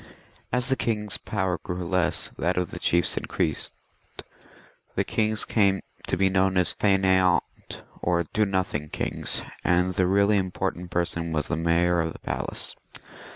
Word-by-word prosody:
As 125 +1 +1
the 135 0 +1
kings' 105 -4 -1
power 95 -4 -1
grew 90 0 -5
less, 90 +1 +1
that 90 +1 -1
of 90 -2 -1
the - - -6
chiefs 85 -1 +2
increased; 80 - -1 1.2
the - - +2
kings 110 -1 0
came 100 -3 +2 0.3
to - - 0
be 95 +1 +4
known 95 0 +2
as 90 -1 +2
Faineant 95 -3 +3 0.6
or 85 0 +1
Do 105 +6 0
nothing 90 -6 -1
kings, - - -1 0.2
and 90 +1 +2
the 90 0 +2
really 100 +2 +4
important 90 -1 -3
person 85 -1 -1
was 75 -2 -1
the - - 0
Mayor 85 +1 +2
of 80 0 -2
the - - -10
Palace. - - -3
90 Hz, 155 wpm, -26 LUFS, 85-95 Hz, 1.2 s, be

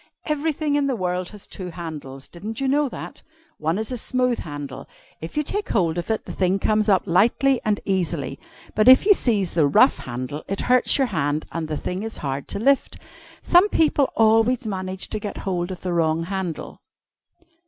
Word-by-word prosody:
Everything 300 0 -1
in 290 -1 +2
the 265 - 0
world 180 -2 -2
has 210 -2 -10
two 185 -2 -7
handles. 150 -6 -7
Didn't 210 +6 -7
you 270 - 0
know 285 +1 +2
that? - - -8 0.4
One 160 +4 0
is 220 +3 -3
a 250 - -3
smooth 250 0 0
handle. 145 -3 -7 0.3
If 160 - -8
you 300 - +2
take 410 +7 -3
hold 175 -4 +1
of 175 - -6
it, 220 - -1
the - - -7
thing 185 0 +1
comes 215 +2 +1
up 190 -3 +4
lightly 240 +8 +3
and 210 -1 0
easily, 170 -8 -2 0.3
but 215 +2 +2
if 260 +7 +8
you 415 - +7
seize 210 - 0
the 160 -4 +3
rough 140 - +4
handle, 130 +4 -5
it 195 - -3
hurts 250 0 +4
your 270 - +3
hand 150 - -1
and 165 -1 -3
the 155 -1 -3
thing 180 +2 -4
is 225 +1 -5
hard 135 0 -3
to - - -3
lift. 275 +6 +1 0.5
Some 365 +4 +5
people 300 -6 +2
always 225 +3 +3
manage 190 -2 -3
to 215 - -3
get 205 -1 -6
hold 175 -2 -1
of 185 -2 -7
the 180 -1 -2
wrong 165 -1 +1
handle." 185 -2 -5
195 Hz, 195 wpm, -23 LUFS, 165-250 Hz, 0.5 s, if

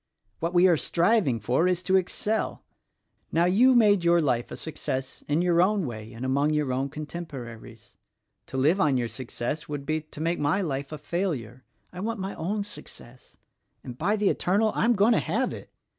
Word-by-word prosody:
What 170 +2 -2
we 175 +2 +6
are 170 -3 +4
striving 170 - +2
for 125 - +1
is 180 0 0
to 190 - +2
excel. 205 +4 -1 0.7
Now, 170 +1 +3
you 240 +9 +5
made 205 -6 +5
your 170 0 +4
life 125 -6 0
a - - -7
success 135 -4 -5
in 150 +4 +1
your 175 -1 +3
own 195 -1 +2
way 110 -3 -7
and 120 +2 -6
among 140 +3 +2
your 145 -4 0
own 135 +2 -1
contemporaries. 130 -8 -8 0.5
To 130 - -5
live 155 +9 +3
on 145 -6 +3
your 120 -1 0
success, 130 +6 -5
would 145 -2 -4
be 155 +1 -1
to 150 -1 -12
make 165 +2 -1
my 150 +6 +1
life 140 -6 -3
a 155 - -5
failure. 145 - -3 0.3
I 180 - -8
want 220 +2 -3
my 195 +1 -4
own 205 +5 -2
success, 130 -10 -12 0.2
— - - -48
and 125 - -7
by 190 - +1
the 210 -2 +2
Eternal, 210 +4 +1
I - - +1
am 240 - +4
going 210 +4 +4
to - - +3
have - - -1
it! - - -10
160 Hz, 200 wpm, -26 LUFS, 130-190 Hz, 0.7 s, we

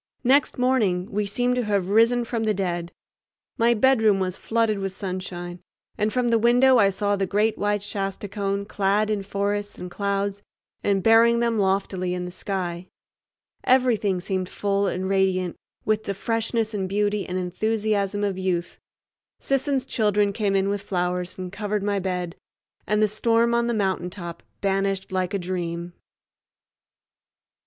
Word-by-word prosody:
Next 275 +4 +3
morning 220 -8 +1
we 205 0 -1
seemed 245 +5 +1
to 245 - 0
have 200 -3 0
risen 230 +3 +4
from 230 -1 -2
the 215 -1 +1
dead. 175 -3 -2 0.7
My 235 +1 +4
bedroom 220 -4 +4
was 185 -1 -1
flooded 225 -2 0
with 195 -1 -4
sunshine, 180 -2 -5 0.4
and 210 +1 0
from 250 0 +1
the 230 -1 +3
window 245 +2 +5
I 200 -2 +5
saw 205 +1 0
the 195 -1 -1
great 210 +3 +1
white 205 0 0
Shasta 195 0 -4
cone 200 0 -2
clad 205 +1 +1
in 210 -2 0
forests 200 +1 -2
and 180 0 -7
clouds 200 +1 -1 0.4
and 195 -2 +1
bearing 230 +1 +5
them 235 -2 +1
loftily 190 -2 0
in 180 0 -3
the 180 - -6
sky. 180 -2 -4 0.8
Everything 235 -7 +3
seemed 185 0 -3
full 200 0 0
and 185 0 -2
radiant 190 -2 +1 0.3
with 215 0 +1
the 200 - -2
freshness 225 +1 -1
and 190 -2 -2
beauty 205 0 0
and 180 0 -3
enthusiasm 205 +2 -1
of 195 -2 -1
youth. 180 -2 -2 0.6
Sisson's 275 -1 0
children 210 -4 +1
came 200 -2 0
in 195 0 +2
with 200 0 -1
flowers 180 -2 -2
and 185 -1 -6
covered 205 +1 -2
my 200 -1 0
bed, 180 -2 -3 0.5
and 210 +1 +2
the - - +5
storm 230 +2 +2
on 235 0 +2
the 235 - 0
mountaintop 180 -3 -3 0.2
banished 195 -1 0
like 185 0 -1
a - - +2
dream. 175 -1 -4
200 Hz, 160 wpm, -24 LUFS, 185-220 Hz, 0.8 s, window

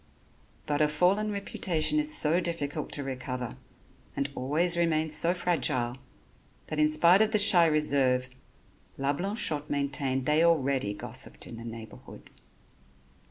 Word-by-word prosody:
But 145 0 -1
a 150 - +4
fallen 185 +8 0
reputation 200 - -1
is 300 0 +1
so 170 - +3
difficult 160 -4 -4
to 145 - -2
recover 130 -2 -6 0.6
and 140 0 -3
always 155 +8 +1
remains 160 -2 0
so 170 +4 +4
fragile 130 -9 -1 0.7
that, 155 - -4
in 150 0 +3
spite 170 +5 +5
of 220 0 +2
the - - +4
shy 185 -5 +6
reserve, 140 -5 +1 0.7
La 140 +1 -1
Blanchotte 165 -4 0
maintained 140 -2 -2
they 150 +3 +2
already 135 -10 +1
gossiped - - -6
in 115 - -10
the 115 - -9
neighborhood. 115 -1 -11
150 Hz, 135 wpm, -27 LUFS, 135-170 Hz, 0.7 s, shy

